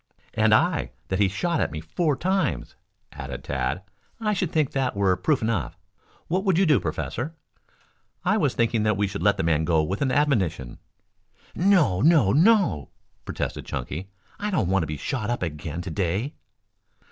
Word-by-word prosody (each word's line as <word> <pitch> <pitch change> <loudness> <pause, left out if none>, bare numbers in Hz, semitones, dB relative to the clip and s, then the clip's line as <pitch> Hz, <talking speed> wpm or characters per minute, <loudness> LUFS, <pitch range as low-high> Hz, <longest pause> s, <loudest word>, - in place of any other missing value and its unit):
"And - - +3
I - - +2 0.2
that 95 - -1
he 100 - +4
shot 170 - -1
at - - +1
me 80 +2 -5
four 145 - -1
times," 190 +6 -1 0.4
added - - -7
Tad. - - -2 0.4
"I 215 -2 0
should 185 -3 -1
think 155 -4 +1
that 130 -4 -1
were 100 -2 +2
proof 120 - 0
enough. 105 - -1 0.5
What 185 +3 0
would 190 -5 +2
you 195 - +4
do, 150 -8 +4
Professor?" 145 +11 -4 0.9
"I - - +3
was - - +1
thinking 115 -1 +1
that 105 -2 +1
we 105 - +2
should 100 0 -5
let 105 -1 +3
the 95 - -1
man 80 -1 +2
go 80 -1 +2
with 95 +6 -3
an 135 -2 +1
admonition." 95 - 0 0.7
"No, 170 - +3
no, 150 - +5
no," 165 - +3 0.4
protested - - -4
Chunky. 75 +8 -5 0.3
"I 210 - -2
don't 165 - 0
want 95 0 +2
to 80 - -2
be 75 0 -4
shot 115 - -3
up 120 -5 -1
again 80 +1 -4
to 85 - -5
day." 95 - -1
105 Hz, 180 wpm, -25 LUFS, -, 0.9 s, no